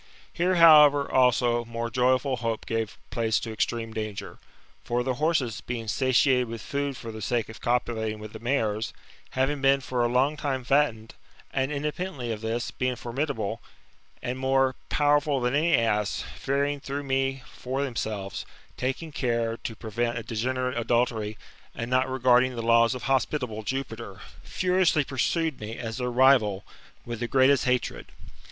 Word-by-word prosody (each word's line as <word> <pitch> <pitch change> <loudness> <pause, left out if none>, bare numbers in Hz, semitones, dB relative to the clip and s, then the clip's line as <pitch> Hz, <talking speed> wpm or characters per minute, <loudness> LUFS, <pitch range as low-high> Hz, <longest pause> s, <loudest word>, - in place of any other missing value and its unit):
Here, 180 +2 +1
however, 150 -4 +7
also, 120 -2 +3
more 115 0 -4
joyful 130 +2 +2
hope 115 -2 -3
gave 115 -2 -2
place 110 -1 +1
to 115 - -5
extreme 115 +1 -2
danger. 110 -2 -5 0.4
For 120 +1 -1
the 130 0 0
horses, 150 -8 +1
being 115 -2 -5
satiated 130 +1 +3
with 115 0 -7
food 140 -2 -2
for 115 - -7
the 110 0 -8
sake 115 +1 -1
of 110 - -11
copulating 115 -3 -1
with 105 0 -10
the 110 - -8
mares, 115 -3 -1 0.4
having 135 +2 +1
been 135 0 +4
for 125 -2 -1
a - - +3
long 135 +5 +2
time 135 -4 -2
fattened; 120 -5 +1 0.4
and, 135 +1 0
independently 150 -3 -3
of 110 -1 -4
this, 115 +2 -2
being 130 0 -1
formidable, 120 -4 -3 0.6
and 125 +1 -3
more 135 0 +2 0.2
powerful 145 -1 +2
than 125 0 0
any 160 +4 +3
ass, 105 -3 0
fearing 140 +1 -1
through 140 +1 -4
me 135 -1 -1
for 130 +2 -4
themselves, 110 -7 -4 0.3
taking 135 +5 -3
*care 115 -4 -1
to 115 - -6
prevent 120 +2 -2
a 115 - -4
degenerate 125 +2 -2
adultery, 115 -2 0 0.4
and 115 +1 -5
not 130 +1 +2
regarding 130 0 +3
the 115 - -4
laws 115 +1 +4
of 125 - -7
hospitable 130 -4 0
Jupiter, 115 -4 -5 0.2
furiously 180 -4 +2
pursued 145 +4 -1
me, 110 +2 -6
as 115 -1 -5
their 125 0 -1
rival, 120 -6 +4 0.4
with 120 -1 -5
the 120 - -2
greatest 135 +2 +4
hatred. 125 -1 -1
125 Hz, 160 wpm, -26 LUFS, 115-135 Hz, 0.6 s, however